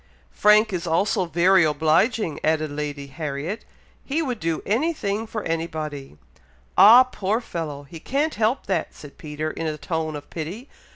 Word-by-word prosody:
"Frank 210 Hz, 0 st, +4 dB
is 175 Hz, -1 st, -3 dB
also 185 Hz, +4 st, +1 dB
very 175 Hz, +2 st, +4 dB
obliging!" 160 Hz, -, +1 dB
added 155 Hz, -1 st, +1 dB
Lady 145 Hz, -1 st, -4 dB
Harriet; 150 Hz, +7 st, -5 dB, 0.4 s
"he 310 Hz, +4 st, -1 dB
would 250 Hz, -6 st, -3 dB
do 165 Hz, -1 st, -2 dB
anything 225 Hz, -4 st, -1 dB
for 215 Hz, -1 st, -5 dB
any 165 Hz, 0 st, -1 dB
body." 145 Hz, -, -7 dB, 0.6 s
"Ah, 220 Hz, +7 st, +9 dB
poor 220 Hz, -4 st, -2 dB
fellow! 155 Hz, -, -6 dB
he 160 Hz, +4 st, -11 dB
can't 285 Hz, -, -1 dB
help 225 Hz, +4 st, 0 dB
that," 185 Hz, -4 st, -2 dB
said 145 Hz, -2 st, -13 dB
Peter, 155 Hz, 0 st, -4 dB
in 165 Hz, -, -4 dB
a 155 Hz, -1 st, -3 dB
tone 160 Hz, -1 st, -3 dB
of 145 Hz, 0 st, -8 dB
pity. 175 Hz, -, -6 dB
165 Hz, 160 wpm, -23 LUFS, 155-215 Hz, 0.6 s, Ah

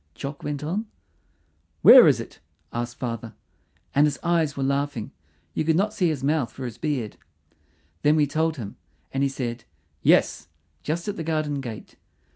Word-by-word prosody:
Jock 140 Hz, +1 st, -6 dB
went 145 Hz, 0 st, -4 dB
on. 195 Hz, +9 st, -2 dB, 1.0 s
"Where -, -, +10 dB
is -, -, +4 dB
it?" -, -, -9 dB, 0.3 s
asked 120 Hz, 0 st, -4 dB
father, 115 Hz, -2 st, -5 dB, 0.6 s
and 145 Hz, +2 st, +5 dB
his 145 Hz, -, -2 dB
eyes 165 Hz, -4 st, +1 dB
were 135 Hz, -, -1 dB
laughing; 140 Hz, -4 st, -1 dB, 0.4 s
you -, -, 0 dB
could 160 Hz, 0 st, +2 dB
not 205 Hz, +4 st, +1 dB
see 185 Hz, -6 st, +1 dB
his 145 Hz, -4 st, -3 dB
mouth 145 Hz, -3 st, +1 dB
for 130 Hz, -, -7 dB
his 120 Hz, -1 st, -7 dB
beard. 140 Hz, -9 st, -2 dB, 0.8 s
Then 150 Hz, +1 st, +4 dB
we 150 Hz, -2 st, +4 dB
told 160 Hz, +2 st, 0 dB
him, 105 Hz, -5 st, -7 dB, 0.4 s
and 135 Hz, -, 0 dB
he 140 Hz, -, +2 dB
said 125 Hz, -3 st, -4 dB, 0.4 s
"Yes," -, -, +3 dB, 0.3 s
just 170 Hz, +5 st, -3 dB
at 205 Hz, -, -3 dB
the 165 Hz, -, -3 dB
garden 155 Hz, -3 st, -1 dB
gate. 115 Hz, -5 st, -8 dB
145 Hz, 170 wpm, -25 LUFS, 130-160 Hz, 1.0 s, Where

